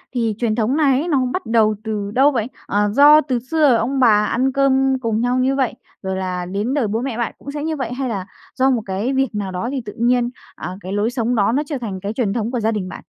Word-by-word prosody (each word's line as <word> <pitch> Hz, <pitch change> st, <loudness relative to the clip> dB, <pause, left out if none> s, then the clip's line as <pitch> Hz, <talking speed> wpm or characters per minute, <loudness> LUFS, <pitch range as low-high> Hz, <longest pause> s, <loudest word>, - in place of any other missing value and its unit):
thì 230 Hz, -3 st, 0 dB
truyền 225 Hz, -2 st, 0 dB
thống 240 Hz, +5 st, 0 dB
này 275 Hz, -4 st, +3 dB
ấy 325 Hz, -, -3 dB
nó 275 Hz, -6 st, +2 dB
bắt 370 Hz, -, -3 dB
đầu 220 Hz, -2 st, +3 dB
từ 210 Hz, -2 st, -3 dB
đâu 275 Hz, +5 st, +4 dB
vậy? 230 Hz, -4 st, -1 dB, 0.2 s
Ờ, 205 Hz, +1 st, +1 dB
do 295 Hz, +3 st, +7 dB
từ 260 Hz, -4 st, -1 dB
xưa 285 Hz, +1 st, +2 dB
ông 260 Hz, +4 st, 0 dB
bà 210 Hz, -4 st, +5 dB
ăn 255 Hz, +6 st, +1 dB
cơm 270 Hz, -1 st, +2 dB
cùng 225 Hz, -2 st, -1 dB
nhau 245 Hz, +1 st, +1 dB
như 265 Hz, +2 st, +2 dB
vậy, 265 Hz, -4 st, 0 dB, 0.3 s
rồi 190 Hz, -1 st, -3 dB
là 180 Hz, -1 st, -3 dB
đến 205 Hz, +8 st, -2 dB
đời 265 Hz, -7 st, +1 dB
bố 220 Hz, +3 st, -1 dB
mẹ 250 Hz, -3 st, -3 dB
bạn 235 Hz, -, -2 dB
cũng 280 Hz, -, -8 dB
sẽ 295 Hz, 0 st, -5 dB
như 320 Hz, 0 st, -1 dB
vậy, 250 Hz, -4 st, -4 dB
hay 265 Hz, 0 st, -3 dB
là 195 Hz, -5 st, -3 dB, 0.3 s
do 265 Hz, 0 st, +3 dB
một 245 Hz, -4 st, +1 dB
cái 200 Hz, +7 st, -2 dB
việc 265 Hz, -4 st, 0 dB
nào 200 Hz, -2 st, -3 dB
đó 185 Hz, +6 st, -3 dB
thì 270 Hz, -2 st, -2 dB
tự 205 Hz, -, -7 dB
nhiên, 240 Hz, +1 st, +2 dB, 0.3 s
à, 180 Hz, +3 st, -6 dB
cái 185 Hz, -, -7 dB
lối 205 Hz, +2 st, +1 dB
sống 240 Hz, -1 st, -1 dB
đó 205 Hz, -1 st, +2 dB
nó 280 Hz, +5 st, +1 dB
trở 290 Hz, -1 st, -4 dB
thành 205 Hz, -6 st, -5 dB
cái 200 Hz, +3 st, -4 dB
truyền 225 Hz, -4 st, -1 dB
thống 230 Hz, 0 st, -2 dB
của 250 Hz, -, -1 dB
gia 220 Hz, 0 st, +1 dB
đình 200 Hz, -4 st, -3 dB
bạn? -, -, -9 dB
240 Hz, 275 wpm, -20 LUFS, 210-270 Hz, 0.3 s, do